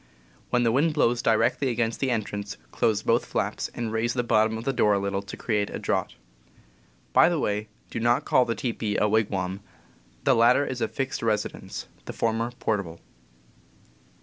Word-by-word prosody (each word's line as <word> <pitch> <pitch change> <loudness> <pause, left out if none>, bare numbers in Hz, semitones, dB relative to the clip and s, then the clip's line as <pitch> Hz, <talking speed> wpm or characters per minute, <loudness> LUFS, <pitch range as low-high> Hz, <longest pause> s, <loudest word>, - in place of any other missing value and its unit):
When 125 -1 +2
the 115 - +3
wind 150 +6 +2
blows 120 -5 +2
directly 115 +4 +2
against 115 -1 -1
the 135 - 0
entrance, 105 -3 -3
close 110 -1 +1
both 115 +1 +2
flaps, - - -2
and 115 -2 -3
raise 115 +2 0
the 125 - +1
bottom 110 -1 +2
of 115 - -6
the 135 - 0
door 105 -4 +3
cover 100 - +2
a - - -5
little 100 0 -1
to 100 - -9
Fig. - - -24
4. - - -14
create 105 -3 +1
a - - -5
draught. - - -1 1.0
By - - +6
the 175 - 0
way, 105 -5 -1 0.2
do - - -3
not 120 +1 +2
call 125 - +4
the 115 - -2
teepee 110 -1 -2
a 105 - +3
wigwam; 100 -3 0 0.6
the - - +4
latter 125 +5 +4
is 130 -3 -4
a - - +2
fixed 135 -1 -3
residence, 110 -2 -2 0.2
the - - -6
former 115 +1 0
portable. 95 -6 -2
115 Hz, 195 wpm, -26 LUFS, 105-120 Hz, 1.0 s, By